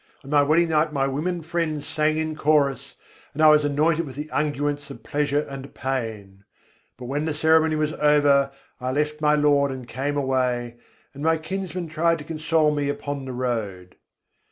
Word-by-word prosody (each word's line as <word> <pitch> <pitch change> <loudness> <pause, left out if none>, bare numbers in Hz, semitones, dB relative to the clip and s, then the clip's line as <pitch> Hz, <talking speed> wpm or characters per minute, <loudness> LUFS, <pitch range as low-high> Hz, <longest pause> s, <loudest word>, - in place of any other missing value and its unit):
On 135 - -10
my 145 -1 +5
wedding 160 +4 +3
night 155 0 +2
my 135 -2 0
women 160 +6 -2
friends 155 -3 -2
sang 155 0 0
in 155 0 -2
chorus, 145 -3 +1 0.4
and 155 - +1
I 155 - +9
was 150 0 +5
anointed 155 +3 +1
with 130 - -9
the 150 +2 -6
unguents 145 -1 -1
of 115 - -10
pleasure 145 0 0
and 135 0 -9
pain: 110 -7 -4 0.5
But 125 - -9
when 145 +4 -2
the 160 -2 -2
ceremony 160 +1 +3
was 155 0 -1
over, 145 -3 +3 0.3
I 130 0 -2
left 150 +1 -1
my 150 0 +4
Lord 145 -1 +3
and 130 -2 -7
came 145 +3 -3
away, 125 -3 -1 0.4
and 140 - -10
my 160 +1 +2
kinsman 180 +1 -5
tried 165 +1 +1
to 150 - -9
console 155 0 +1
me 145 -1 -1
upon 145 -1 -4
the 130 - -6
road. 110 -8 -3
145 Hz, 180 wpm, -24 LUFS, 135-155 Hz, 0.5 s, I